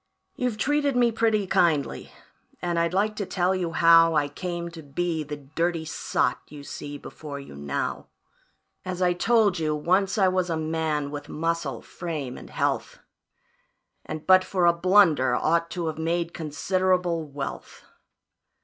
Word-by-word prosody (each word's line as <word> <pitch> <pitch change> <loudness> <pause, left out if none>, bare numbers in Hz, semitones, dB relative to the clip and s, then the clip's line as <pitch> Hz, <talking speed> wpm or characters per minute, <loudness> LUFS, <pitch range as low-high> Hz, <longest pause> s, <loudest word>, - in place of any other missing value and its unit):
"You've 250 -4 -2
treated 290 +2 +1
me 240 -1 +4
pretty 220 -2 +1
kindly 160 -6 +1 0.5
and 175 -1 -1
I'd 170 0 +1
like 210 +3 +1
to 200 - -2
tell 185 0 +1
you 175 -3 -2
how 165 -1 +6
I 145 -1 +2
came 175 +2 -4
to 165 -1 -9
be 160 +3 -2
the 150 0 -6
dirty 160 +4 -2
sot 125 -5 -1
you 145 -1 -11
see 145 0 -7
before 145 -1 -8
you 140 - -11
now. 70 0 -3 0.8
As 185 -1 -4
I 180 0 +3
told 215 -1 +2
you, 155 -1 0
once 185 +7 +1
I 195 -2 +4
was 185 -1 +1
a 165 - 0
man, 155 -2 -1
with 145 0 -7
muscle, 165 -6 -2
frame, 150 -7 -5
and - - -11
health, - - -1 1.1
And 155 0 -7
but 185 0 +6
for 185 -2 0
a 170 - +6
blunder 170 -8 +4
ought 170 +4 +1
to 175 -1 -3
have 160 0 -3
made 170 +1 -1
considerable 180 +2 0
wealth. 140 -1 -7
170 Hz, 160 wpm, -25 LUFS, 150-185 Hz, 1.1 s, how